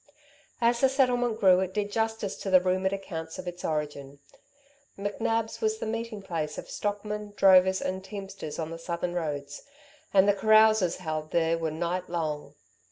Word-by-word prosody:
As 235 0 +3
the 265 - +5
settlement 245 -4 +1
grew, 185 -3 +6
it 190 +1 -3
did 205 -1 -1
justice 220 -2 -1
to 195 - -5
the 185 -1 +7
rumoured 185 +1 0
accounts 170 -5 -5
of 185 - -7
its 175 0 -6
origin. 145 -3 -3 0.8
McNab's 225 +3 -2
was 435 0 +1
the - - -5
meeting 225 -2 -4
place 155 -5 -3
of - - -7
stockmen, 210 0 -3
drovers 190 -1 +6
and 190 0 -3
teamsters 195 -6 -7
on 160 -1 -4
the 165 - -7
southern 170 +1 -3
roads, 145 -4 -4 0.5
and 195 0 +5
the 205 - +5
carouses 215 -2 +4
held 155 -3 -4
there 165 0 +2
were 165 -1 -2
night 175 +3 -3
long. 155 -4 -3
190 Hz, 165 wpm, -28 LUFS, 165-210 Hz, 0.8 s, the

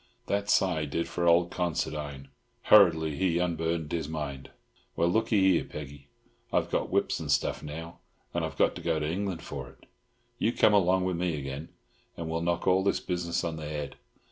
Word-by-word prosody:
That 100 0 -1
sigh 85 -7 +2
did 85 +3 -2
for 85 0 -1
old 85 +1 +4
Considine. 75 -5 -3 0.3
Hurriedly 80 -7 +6
he 90 -3 +1
unburdened 80 -2 -1
his 80 -3 -2
mind. 75 -4 -5 0.5
"Well, 85 - +2
look'ee 110 +2 +2
here, 85 - +2
Peggy—I've 70 -1 -6
got - - 0
whips - - +1
of - - -3
stuff - - +1
now, 80 +3 -8 0.3
and - - -1
I've - - -4
got - - +3
to - - -7
go 80 -2 0
to 75 - -1
England 90 +1 -3
for 65 -4 -6
it. - - -20 0.5
You 115 - +1
come 105 - +4
along 95 -2 +3
o' 95 - 0
me 85 -2 -1
again, 70 +3 -6 0.5
and 85 - -4
we'll 80 +1 -2
knock 85 0 -1
all 95 +1 +4
this 100 - +1
business 85 -2 -2
on 80 -1 -3
the 75 -1 -6
head. 75 -2 -4
85 Hz, 185 wpm, -29 LUFS, 75-90 Hz, 0.5 s, Hurriedly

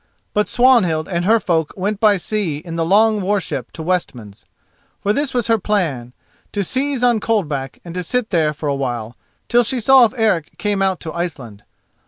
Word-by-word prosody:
But 210 0 +1
Swanhild 225 -11 +3
and 175 -1 -2
her 225 +3 +4
folk 165 -6 -1
went 200 +2 -2
by 210 -2 +4
sea 185 -4 -2
in 165 +2 -8
the 165 - 0
long 210 +4 +3
war 200 +2 +1
ship - - -5
to 160 - -7
Westmans. 130 - -3 0.5
For 205 - 0
this 285 +3 -1
was 245 -3 -1
her 225 -1 +2
plan: 155 - -2 0.4
to 205 - -1
seize 265 +5 -2
on 240 -3 +3
Coldback 150 - -2
and 170 - -8
to 180 - -3
sit 245 +5 -1
there 160 -4 +2
for 150 0 -6
a 140 - +1
while, 120 -4 -4 0.3
till 240 0 +4
she 245 +2 -1
saw 265 +3 +6
if 230 - -3
Eric 210 -9 0
came 205 -2 -1
out 190 -2 0
to 160 - -6
Iceland. 135 - -5
190 Hz, 200 wpm, -19 LUFS, 155-220 Hz, 0.5 s, saw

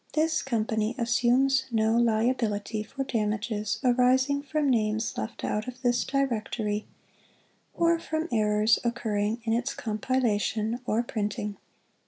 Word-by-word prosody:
This 315 0 +1
Company 220 -2 -1
Assumes 250 +3 +2
no 220 -1 +2
Liability 220 -2 +1
for 270 +6 -5
damages 215 -3 -1
arising 260 +3 +3
from 295 +1 -1
names 220 -3 +1
left 220 - -5
out 210 +3 -1
of 255 0 -7
this 245 -1 +2
Directory 220 -5 -1 0.9
or 335 0 +3
from 315 0 -3
errors 215 -1 +3
occurring 220 -1 -1
in 225 -1 0
its 245 +4 -1
compila 220 0 0
tion 220 +3 -1
or 225 +3 +1
printing. 210 -2 -3
230 Hz, 125 wpm, -27 LUFS, 215-260 Hz, 0.9 s, arising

